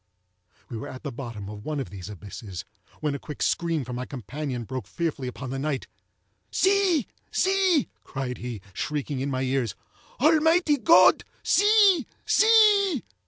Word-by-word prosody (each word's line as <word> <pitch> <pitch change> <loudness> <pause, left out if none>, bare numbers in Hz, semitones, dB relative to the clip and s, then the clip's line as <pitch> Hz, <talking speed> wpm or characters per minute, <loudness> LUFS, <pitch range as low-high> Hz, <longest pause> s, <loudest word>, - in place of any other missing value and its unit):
We 120 - -6
were 110 - -6
at 130 - -9
the - - -4
bottom 115 -5 -7
of 105 0 -9
one 150 +2 -3
of 115 -10 -5
these 95 0 -8
abysses, 100 -2 -8 0.4
when 150 -2 0
a 140 - -4
quick 150 - -6
scream 165 -4 0
from 125 0 -6
my 125 - -5
companion 130 +1 -5
broke 130 +2 -6
fearfully 160 -6 -3
upon 130 +1 -6
the 135 - -3
night. 140 -1 -2 0.6
"See! 380 - +2 0.3
see!" 380 -5 +2 0.2
cried 130 -3 -5
he, 120 -4 -6
shrieking 145 - -3
in 135 +2 -2
my 130 -1 -1
ears, 130 -5 -1 0.4
"Almighty 320 +1 +4
God! 330 +5 +6 0.2
see! 410 - +4 0.2
see!" 415 - +5
140 Hz, 155 wpm, -26 LUFS, -, 0.6 s, God